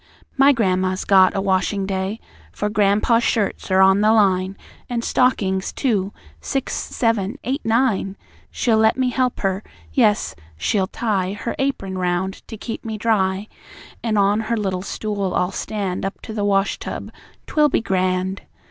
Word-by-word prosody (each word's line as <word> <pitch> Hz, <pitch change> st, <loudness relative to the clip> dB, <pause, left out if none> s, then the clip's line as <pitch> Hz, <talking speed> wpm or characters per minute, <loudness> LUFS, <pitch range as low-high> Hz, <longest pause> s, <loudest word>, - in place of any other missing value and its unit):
My 275 Hz, +1 st, +6 dB
gran'ma's 185 Hz, -6 st, 0 dB
got 190 Hz, -1 st, +5 dB
a 195 Hz, -, 0 dB
washing 195 Hz, +1 st, 0 dB
day; 190 Hz, +2 st, -2 dB, 0.3 s
For 210 Hz, -, -2 dB
gran'pa's 215 Hz, +3 st, +3 dB
shirts 210 Hz, -4 st, -1 dB
are 190 Hz, 0 st, +4 dB
on 190 Hz, +1 st, +5 dB
the 215 Hz, +1 st, +4 dB
line, 190 Hz, -3 st, +2 dB, 0.3 s
An' 235 Hz, -1 st, -2 dB
stockings, 195 Hz, -8 st, +1 dB
too 205 Hz, -7 st, 0 dB, 0.3 s
six, 270 Hz, -, -3 dB
seven, 225 Hz, 0 st, -1 dB
eight, 270 Hz, +4 st, -2 dB
nine! 225 Hz, -4 st, +1 dB, 0.3 s
She'll 225 Hz, -3 st, +1 dB
let 220 Hz, +2 st, +3 dB
me 255 Hz, -1 st, +1 dB
help 255 Hz, -1 st, 0 dB
her. 195 Hz, 0 st, 0 dB, 0.3 s
Yes, 215 Hz, -5 st, +2 dB, 0.2 s
she'll 190 Hz, -, 0 dB
tie 195 Hz, -4 st, -1 dB
Her 210 Hz, +3 st, -4 dB
apron 195 Hz, -9 st, -2 dB
round 180 Hz, +1 st, -1 dB
to 220 Hz, -, -8 dB
keep 225 Hz, +2 st, -6 dB
me 220 Hz, -1 st, -4 dB
dry; 200 Hz, -2 st, +1 dB, 0.5 s
An' 220 Hz, -2 st, 0 dB
on 200 Hz, +1 st, +3 dB
her 225 Hz, +1 st, -1 dB
little 190 Hz, -3 st, -1 dB
stool 200 Hz, -1 st, -3 dB
I'll 180 Hz, +1 st, +1 dB
stand 195 Hz, -2 st, -3 dB
Up 195 Hz, +1 st, -4 dB
to 220 Hz, -, -7 dB
the 210 Hz, -2 st, -2 dB
wash 195 Hz, -1 st, +1 dB
tub. -, -, -6 dB, 0.3 s
'Twill 300 Hz, -1 st, +3 dB
be -, -, +2 dB
grand! 185 Hz, -1 st, 0 dB
200 Hz, 160 wpm, -21 LUFS, 190-225 Hz, 0.5 s, My